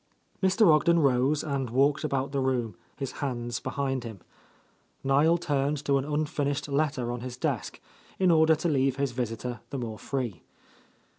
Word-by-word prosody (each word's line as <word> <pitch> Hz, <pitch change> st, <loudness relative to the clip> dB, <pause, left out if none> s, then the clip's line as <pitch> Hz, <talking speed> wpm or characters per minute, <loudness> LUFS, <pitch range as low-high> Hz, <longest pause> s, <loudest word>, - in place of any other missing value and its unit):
Mr. 190 Hz, +3 st, +4 dB
Ogden 170 Hz, +3 st, +4 dB
rose 140 Hz, 0 st, +2 dB
and 140 Hz, -4 st, -2 dB
walked 140 Hz, +5 st, +2 dB
about 140 Hz, -2 st, -1 dB
the 140 Hz, -, -1 dB
room, 125 Hz, -4 st, -1 dB, 0.2 s
his 135 Hz, -2 st, -4 dB
hands 120 Hz, -3 st, -2 dB
behind 135 Hz, -1 st, -2 dB
him. 110 Hz, -5 st, -8 dB, 0.8 s
Niel 145 Hz, +5 st, +4 dB
turned 145 Hz, -3 st, -1 dB
to 140 Hz, -1 st, +3 dB
an 135 Hz, -, -4 dB
unfinishec 145 Hz, -1 st, -1 dB
letter 140 Hz, -5 st, 0 dB
on 120 Hz, 0 st, -4 dB
his 125 Hz, 0 st, -6 dB
desk, -, -, -2 dB, 0.4 s
in 185 Hz, -2 st, +4 dB
order 160 Hz, -1 st, +5 dB
to 155 Hz, +3 st, -2 dB
leave 135 Hz, -4 st, +2 dB
his 140 Hz, -1 st, -1 dB
visitor 120 Hz, 0 st, -4 dB
the 140 Hz, -, -4 dB
more 115 Hz, -4 st, -5 dB
free. 120 Hz, -, -3 dB
135 Hz, 160 wpm, -28 LUFS, 125-150 Hz, 0.8 s, order